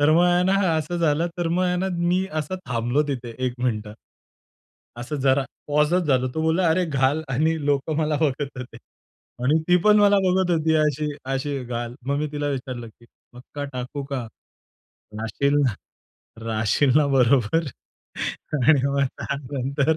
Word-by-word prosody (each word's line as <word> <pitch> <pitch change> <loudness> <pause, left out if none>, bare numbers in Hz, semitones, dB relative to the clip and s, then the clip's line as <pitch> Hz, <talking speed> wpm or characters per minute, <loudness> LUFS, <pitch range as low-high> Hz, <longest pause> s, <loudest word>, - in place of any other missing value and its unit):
तर 145 +1 +4
मग 170 +2 +5
आहे 175 0 +3
ना, 190 +1 +3 0.2
असं 155 +3 -2
झालं 165 -1 +1
तर 170 -1 0
मग 175 +2 +1
आहे 180 0 +1
ना, 185 +2 -1
मी 180 +2 +1
असं 185 +5 -4
थांबलो 120 +3 0
तिथे 125 -4 -4
1 125 - -3
मिनिट. 110 -4 -1 1.1
असं 120 +5 -5
जरा 135 0 +3 0.2
पॉजच 150 +5 +2
झालो. 130 -3 +2
तो 160 - -1
बोलला, 165 +2 +2
"अरे 175 +3 +2
घाल" 140 -1 +1
आणि 155 +5 +2
लोकं 145 +2 0
मला 155 -1 +1
बघत 145 -2 0
होते. 125 -2 -8 0.7
आणि 150 +5 +4
ती 180 - +6
पण 210 0 +6
मला 205 -1 +5
बघत 185 0 +2
होती 160 -1 +2
अशी 150 -1 +1 0.3
अशी 140 +1 -2
"घाल." 120 0 -4
मग 140 +1 0
मी 150 - -1
तिला 145 0 -2
विचारलं 130 -4 -4
की 120 +2 -21 0.3
पक्का 130 +4 -8
टाकू 130 +3 -5
का? 135 -3 -4 1.0
राहशील 115 +6 0
ना 120 - +1 0.7
राहशील 110 +5 +1
ना 150 -1 +4
बरोबर 135 +3 +3 0.9
आणि 145 +1 +4
मग 140 0 +1 0.2
त्यानंतर. 140 +2 -1
145 Hz, 160 wpm, -23 LUFS, 130-160 Hz, 1.1 s, ती